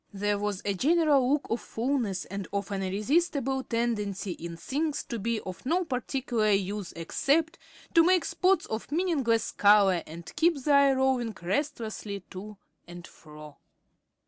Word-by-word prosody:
There 205 Hz, +1 st, 0 dB
was 205 Hz, -2 st, -3 dB
a 200 Hz, -, +1 dB
general 285 Hz, -, +3 dB
look 290 Hz, 0 st, +1 dB
of 230 Hz, -, 0 dB
fulness 230 Hz, -6 st, -2 dB
and 200 Hz, 0 st, -6 dB
of 200 Hz, 0 st, -3 dB
an 195 Hz, -1 st, -2 dB
irresistible 265 Hz, -, 0 dB
tendency 210 Hz, -5 st, -2 dB
in 170 Hz, 0 st, -7 dB
things 295 Hz, -, -2 dB
to 235 Hz, -, -5 dB
be 230 Hz, +2 st, -1 dB
of 185 Hz, -1 st, -8 dB
no 350 Hz, +7 st, +1 dB
particular 250 Hz, -4 st, -1 dB
use 200 Hz, -1 st, -1 dB
except 300 Hz, -, 0 dB, 0.3 s
to 330 Hz, -, +7 dB
make 365 Hz, 0 st, +3 dB
spots 380 Hz, +1 st, +2 dB
of 220 Hz, +5 st, -5 dB
meaningless 290 Hz, -10 st, +1 dB
color 200 Hz, -4 st, +5 dB
and 165 Hz, +1 st, -10 dB
keep 335 Hz, +2 st, +3 dB
the 290 Hz, +3 st, -1 dB
eye 280 Hz, -1 st, +6 dB
roving 260 Hz, -5 st, 0 dB
restlessly 215 Hz, -, -3 dB
to 205 Hz, +2 st, -8 dB, 0.3 s
and 175 Hz, 0 st, -10 dB
fro. 150 Hz, -3 st, -13 dB
230 Hz, 150 wpm, -28 LUFS, 195-280 Hz, 0.3 s, to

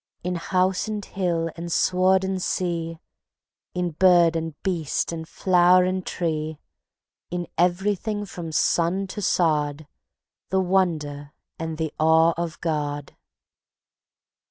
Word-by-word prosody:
In 180 Hz, +1 st, -1 dB
house 185 Hz, +3 st, 0 dB
and 210 Hz, -2 st, -4 dB
hill 170 Hz, -3 st, -1 dB
and 170 Hz, +1 st, -6 dB
sward 185 Hz, +2 st, +3 dB
and 190 Hz, -1 st, -2 dB
sea, 170 Hz, -3 st, -2 dB, 0.8 s
In 180 Hz, -1 st, -1 dB
bird 175 Hz, 0 st, +5 dB
and 165 Hz, -2 st, -3 dB
beast 170 Hz, -7 st, -1 dB
and 160 Hz, -1 st, -6 dB
flower 180 Hz, 0 st, +4 dB
and 185 Hz, 0 st, -1 dB
tree, 155 Hz, -3 st, -2 dB, 0.7 s
In 175 Hz, 0 st, -3 dB
everything 200 Hz, +4 st, 0 dB
from 175 Hz, -4 st, -7 dB
sun 170 Hz, +4 st, +1 dB
to 195 Hz, +2 st, -6 dB
sod, 155 Hz, -5 st, +1 dB, 0.6 s
The 190 Hz, -, +2 dB
wonder 160 Hz, -6 st, 0 dB, 0.3 s
and 160 Hz, -1 st, -4 dB
the 160 Hz, -2 st, -3 dB
awe 160 Hz, +1 st, +5 dB
of 170 Hz, -2 st, -4 dB
God. 145 Hz, -3 st, -3 dB
175 Hz, 120 wpm, -24 LUFS, 160-185 Hz, 0.8 s, bird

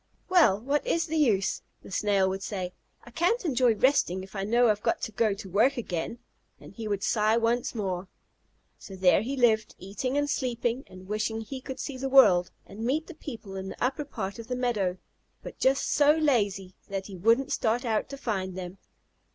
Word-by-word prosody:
"Well, 330 Hz, -, +5 dB
what 280 Hz, +6 st, 0 dB
is 330 Hz, -1 st, +1 dB
the 320 Hz, -, -4 dB
use?" 220 Hz, -11 st, +2 dB, 0.2 s
the -, -, -12 dB
Snail 200 Hz, -1 st, +2 dB
would 190 Hz, +1 st, -3 dB
say. 185 Hz, -3 st, -4 dB, 0.3 s
"I 240 Hz, -, -14 dB
can't 360 Hz, -, +1 dB
enjoy 250 Hz, -6 st, +3 dB
resting 200 Hz, -7 st, +2 dB
if 190 Hz, +2 st, -13 dB
I 195 Hz, -, -2 dB
know 235 Hz, +3 st, +3 dB
I've 210 Hz, -1 st, +1 dB
got -, -, 0 dB
to -, -, -3 dB
go 215 Hz, -1 st, +1 dB
to 200 Hz, 0 st, -9 dB
work 225 Hz, +9 st, +2 dB
again," 180 Hz, -1 st, -3 dB, 0.4 s
and -, -, -13 dB
he 225 Hz, -2 st, -6 dB
would 200 Hz, -1 st, -2 dB
sigh 215 Hz, 0 st, +2 dB
once 235 Hz, +2 st, 0 dB
more. 190 Hz, -3 st, -3 dB, 0.7 s
So 195 Hz, -, -10 dB
there 185 Hz, 0 st, +4 dB
he 265 Hz, +5 st, -3 dB
lived, 220 Hz, -3 st, +2 dB
eating 230 Hz, +8 st, -3 dB
and 290 Hz, 0 st, +1 dB
sleeping, 245 Hz, -1 st, -1 dB
and 185 Hz, 0 st, -13 dB
wishing 215 Hz, +2 st, -2 dB
he 260 Hz, +4 st, -7 dB
could 265 Hz, +1 st, -7 dB
see 265 Hz, -2 st, -5 dB
the 270 Hz, +1 st, -2 dB
world, 185 Hz, -10 st, +6 dB, 0.2 s
and 205 Hz, +3 st, -9 dB
meet 290 Hz, +7 st, 0 dB
the 350 Hz, -, -10 dB
people 225 Hz, -10 st, -8 dB
in 190 Hz, 0 st, -5 dB
the -, -, -8 dB
upper 265 Hz, +4 st, 0 dB
part 215 Hz, -7 st, -5 dB
of 230 Hz, -, -8 dB
the 250 Hz, -, -2 dB
meadow, 215 Hz, -8 st, 0 dB, 0.5 s
but -, -, -9 dB
just 270 Hz, +1 st, +2 dB
so 295 Hz, +1 st, +5 dB
lazy 205 Hz, -11 st, +1 dB, 0.2 s
that 195 Hz, -1 st, -3 dB
he 195 Hz, -, -9 dB
wouldn't 230 Hz, +8 st, +2 dB
start 235 Hz, +2 st, 0 dB
out 220 Hz, -2 st, 0 dB
to 275 Hz, -, -7 dB
find 190 Hz, -7 st, -3 dB
them. 185 Hz, +1 st, -7 dB
225 Hz, 205 wpm, -28 LUFS, 195-260 Hz, 0.7 s, world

